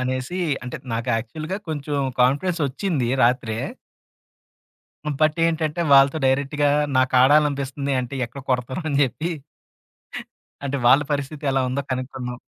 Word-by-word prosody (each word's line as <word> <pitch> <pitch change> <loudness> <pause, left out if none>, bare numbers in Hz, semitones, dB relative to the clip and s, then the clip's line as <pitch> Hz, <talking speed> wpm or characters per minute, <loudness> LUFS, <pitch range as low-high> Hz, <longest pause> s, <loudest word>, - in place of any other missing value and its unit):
అనేసి 130 +7 -2 0.3
అంటే, 125 - -5 0.2
నాకు 115 +2 -3
యాక్చువల్‌గా 155 - -4
కొంచెం 145 -2 -3 0.2
కాన్ఫిడెన్స్ 150 +7 +2
ఒచ్చింది 140 - -1
రాత్రే. 120 -2 +1 1.5
హ్మ్. 150 -2 -2
బట్ 155 0 +3
ఏంటంటే 160 0 -1
వాళ్ళతో 135 +3 +5
డైరెక్ట్‌గా 140 +2 +1 0.3
నాకాడాలనిపిస్తుంది 140 +1 +3
అంటే 125 +1 -6
ఎక్కడ 125 +4 -10
కొడతారొ 130 +6 -1
అని 140 - +1
జెప్పి. 150 +6 -1 1.3
అంటే 140 0 -1
వాళ్ళ 135 +4 +6
పరిస్థితెలా 140 -1 -1
ఉందో 140 +3 -2
కనుక్కుందాం. 125 -1 -5
140 Hz, 115 wpm, -22 LUFS, 130-150 Hz, 1.5 s, వాళ్ళ